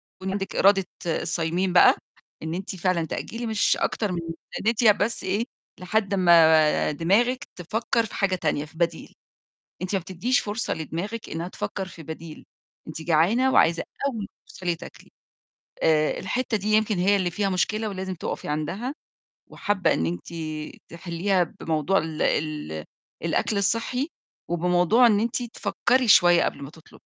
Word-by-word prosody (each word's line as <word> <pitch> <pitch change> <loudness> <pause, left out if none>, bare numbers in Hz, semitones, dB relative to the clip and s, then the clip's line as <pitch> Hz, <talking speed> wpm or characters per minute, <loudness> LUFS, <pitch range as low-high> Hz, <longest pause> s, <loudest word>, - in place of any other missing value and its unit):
يكون 190 0 -5
عندِك 195 0 -4
إرادة 195 -1 +4 0.2
الصايمين 175 +2 -1
بقى، - - +7 0.5
إن 160 +1 -3
أنتِ 190 +2 -5
فعلًا 180 -2 0
تأجّلي 230 +8 -5
مش 220 -2 +2
أكتر 210 -4 -1
من 175 - -2
يا 165 - -4 0.3
ريت 230 +1 +2
يا 220 - +8
بس 210 +3 -1
إيه، 205 +5 0 0.3
لحد 200 +2 0
أما 160 -5 +5
دماغِك 205 - +1
تفكّر 225 +6 -1
في - - -9
حاجة 195 -2 +1
تانية 155 -4 -1
في 160 - -18
بديل. 170 -1 -2 0.7
أنتِ 185 +2 -2
ما 190 - 0
بتدّيّش 190 +8 0
فرصة 210 +3 -2
لدماغِك 175 +8 -5
إنّها 165 +2 -4
تفكّر 190 +1 -4
في 165 -2 -11
بديل، 160 0 -9 0.4
أنتِ 155 +1 -7
جعانة 180 +12 +3
وعايزة 165 +1 +4 0.2
أول 255 -5 -3
ما 200 - -5 0.2
توصلي 180 -3 -3
تأكلي. - - -13 0.7
آآ، 155 -1 +2
الحتة 240 +3 -1
دي 205 +1 -5
يمكن 215 -2 +2
هي 195 +3 +3
اللي 180 -3 0
فيها 200 +3 -1
مشكلة 215 +4 0
ولازم 190 -1 -4
تقَفي - - -5
عندها 190 - -3 0.5
وحابّّة 205 -2 0
إن 80 - 0
أنتِ 85 - -5 0.5
تحلّيها 175 +2 0 0.2
بموضوع 160 +4 +1
ال 160 0 -3
ال 150 - -1 0.4
الأكل 205 - 0
الصحّي 230 - 0 0.4
وبموضوع 180 +7 +3
إن 210 -3 +4
أنتِ 235 +2 -1
تفكّري 245 +1 0
شوية 175 -4 +6
قبل - - -3
ما 140 - -7
تطلب 160 0 -17
185 Hz, 155 wpm, -25 LUFS, 165-210 Hz, 0.7 s, يا